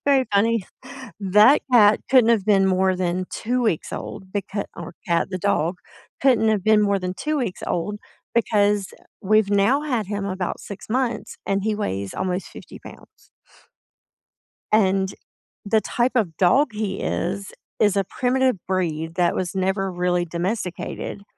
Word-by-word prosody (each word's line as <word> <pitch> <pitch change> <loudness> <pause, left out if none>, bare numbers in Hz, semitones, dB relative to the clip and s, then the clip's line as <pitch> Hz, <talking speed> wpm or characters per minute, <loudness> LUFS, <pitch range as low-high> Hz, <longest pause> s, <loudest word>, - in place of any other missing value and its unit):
Very 275 -2 +4
funny. 220 -1 +2 0.5
That 210 +8 +5
cat 215 -3 +6
couldn't 250 -3 +6
have 215 -4 +2
been 195 -2 +4
more 190 0 +2
than 180 0 -1
2 250 +3 -2
weeks 215 -9 -1
old 190 0 -7
becau 200 0 -3
or 170 0 -8
"cat," 170 -1 +1
the 185 - -2
dog 175 -2 0 0.5
couldn't 240 -5 +4
have 210 -3 +1
been 215 -1 +5
more 200 -1 +2
than 180 0 -3
2 305 +6 -2
weeks 225 -9 -3
old 205 +5 -2 0.4
because, 205 -3 +2 0.3
we've 215 +1 +3
now 205 +8 +3
had 245 -9 -1
him 200 -1 -3
about 185 -2 -3
6 200 -1 -9
months, 250 -1 -2
and 195 0 0
he 215 -1 +1
weighs 100 - -3
almost 185 0 -2
50 - - -12
pounds. - - -16 1.4
And 195 -2 +2 0.5
the 220 +1 +2
type 245 +1 0
of 190 -9 0
dog 230 +12 +4
he 210 -2 -3
is 195 +3 -3 0.3
is 205 -2 +3
a 195 - +2
primitive 255 +3 0
breed 165 -3 -2
that 175 -2 +2
was 185 0 -3
never 190 +1 0
really 180 0 0
domesticated, 180 +3 -4
200 Hz, 155 wpm, -22 LUFS, 185-220 Hz, 1.4 s, cat